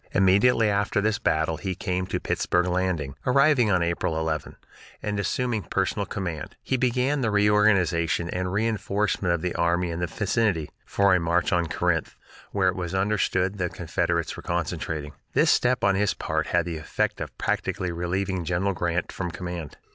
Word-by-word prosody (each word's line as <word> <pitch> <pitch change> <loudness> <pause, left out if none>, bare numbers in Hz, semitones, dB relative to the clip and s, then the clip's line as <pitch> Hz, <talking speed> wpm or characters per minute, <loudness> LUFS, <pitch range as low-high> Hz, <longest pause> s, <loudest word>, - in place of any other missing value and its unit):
Immediately 100 +5 +4
after 100 0 +1
this 110 +1 +1
battle 80 -5 +1
he 95 -2 -3
came 90 +1 -2
to - - -2
Pittsburg 90 0 0
Landing, 90 -6 -1
arriving 135 -3 +4
on 90 -3 +3
April 85 -1 -1
11, 80 -1 -3 0.5
and, 105 -1 -2
assuming 115 +2 -1
personal 95 +3 -1
command, 85 -7 -5
he 130 - 0
began 130 +3 +1
the 115 - +1
reorganization 100 -5 +3
and 90 0 -2
reinforcement 105 -2 0
of 85 -1 0
the 90 - -1
army 85 +1 +1
in 85 - -4
the 90 - -1
vicinity, 100 -2 0 0.2
for 100 -1 +3
a 90 - +4
march 85 +2 +1
on 85 -2 +2
Corinth, 80 0 -1 0.4
where 95 -2 +2
it 90 - +1
was 90 0 -4
understood 95 -1 +1
the 90 -1 0
Confederates 85 0 -1
were - - -8
concentrating. 80 -3 -3 0.2
This - - +4
step 125 0 +2
on 100 - +4
his 100 +1 +1
part - - -2
had - - +1
the 85 -2 -4
effect 75 -3 -2
of - - -6
practically 90 -1 -1
relieving 90 +2 -2
General 90 +4 0
Grant 85 -1 -1
from 90 -2 -4
command. 85 -3 -6
90 Hz, 170 wpm, -25 LUFS, 85-105 Hz, 0.5 s, Immediately